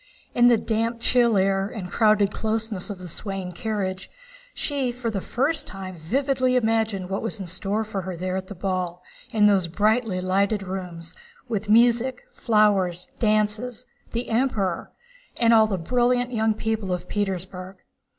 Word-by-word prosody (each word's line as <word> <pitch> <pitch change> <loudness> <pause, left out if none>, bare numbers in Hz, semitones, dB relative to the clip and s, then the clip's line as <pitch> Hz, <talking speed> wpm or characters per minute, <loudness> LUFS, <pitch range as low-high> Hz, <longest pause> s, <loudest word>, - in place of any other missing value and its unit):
In 240 0 +5
the 240 -1 +6
damp 230 +1 -1
chill 235 -2 +3
air 195 0 +2
and 195 -5 -7
crowded 215 -2 +3
closeness 220 -3 -2
of 205 - -5
the 180 0 -9
swaying 190 +1 -4
carriage, 190 -2 -3 0.5
she 275 -4 -1
for 240 -1 -3
the 200 -3 -2
first 280 - 0
time 190 -1 -7
vividly 255 - 0
imagined 220 -5 +1
what 195 +1 -2
was 225 -1 -3
in 190 - -4
store 195 +5 -1
for 210 -3 -4
her 185 -1 -5
there 185 +1 -2
at 190 0 -4
the 200 - -8
ball, 180 -1 -3 0.3
in 210 -2 +4
those 195 -4 +4
brightly 215 +2 +1
lighted 195 +3 +1
rooms—with 185 +4 -6
music, 240 +3 +4
flowers, 195 -6 +2
dances, 215 +3 0 0.3
the 235 +1 -3
Emperor, 220 -7 0 0.5
and 230 -1 +5
all 220 -1 +6
the 200 -3 -1
brilliant 245 +6 +1
young 220 -1 +2
people 220 -3 -2
of 180 0 -3
Petersburg. 190 -2 -3
210 Hz, 155 wpm, -24 LUFS, 185-230 Hz, 0.5 s, the